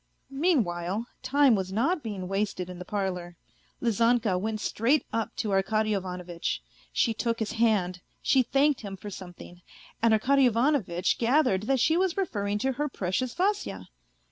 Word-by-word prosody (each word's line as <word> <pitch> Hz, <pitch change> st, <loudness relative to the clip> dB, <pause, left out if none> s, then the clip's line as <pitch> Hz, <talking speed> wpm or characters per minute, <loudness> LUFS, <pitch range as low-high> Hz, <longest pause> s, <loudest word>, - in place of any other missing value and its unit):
Mean 295 Hz, -1 st, +3 dB
while, 175 Hz, +5 st, -3 dB, 0.2 s
time 280 Hz, -2 st, +4 dB
was 190 Hz, -3 st, -1 dB
not 300 Hz, -, +1 dB
being 205 Hz, -6 st, -5 dB
wasted 195 Hz, -2 st, -2 dB
in 180 Hz, -, -9 dB
the 180 Hz, -, -7 dB
parlour. 180 Hz, -4 st, -3 dB, 0.5 s
Lizanka 230 Hz, -2 st, +2 dB
went 215 Hz, +4 st, -2 dB
straight 240 Hz, +8 st, +1 dB
up 225 Hz, -1 st, -2 dB
to 210 Hz, -, -2 dB
Arkady 215 Hz, +3 st, +1 dB
Ivanovitch. 180 Hz, -3 st, -3 dB, 0.3 s
She 230 Hz, -, +2 dB
took 230 Hz, +1 st, -1 dB
his 220 Hz, -2 st, -2 dB
hand, 210 Hz, -6 st, +1 dB, 0.2 s
she 265 Hz, -, +3 dB
thanked 275 Hz, +3 st, +2 dB
him 195 Hz, -3 st, -7 dB
for 205 Hz, +2 st, -8 dB
something, 175 Hz, -1 st, -10 dB, 0.4 s
and 230 Hz, 0 st, +4 dB
Arkady 265 Hz, +5 st, +4 dB
Ivanovitch 230 Hz, -, +1 dB
gathered 235 Hz, -5 st, +2 dB
that 270 Hz, -1 st, +2 dB
she 320 Hz, +7 st, +3 dB
was 370 Hz, -1 st, +1 dB
referring 205 Hz, -, -1 dB
to 265 Hz, -, +2 dB
her 295 Hz, +3 st, -2 dB
precious 235 Hz, +4 st, -2 dB
Vasya. 400 Hz, +3 st, -1 dB
220 Hz, 160 wpm, -27 LUFS, 190-260 Hz, 0.5 s, time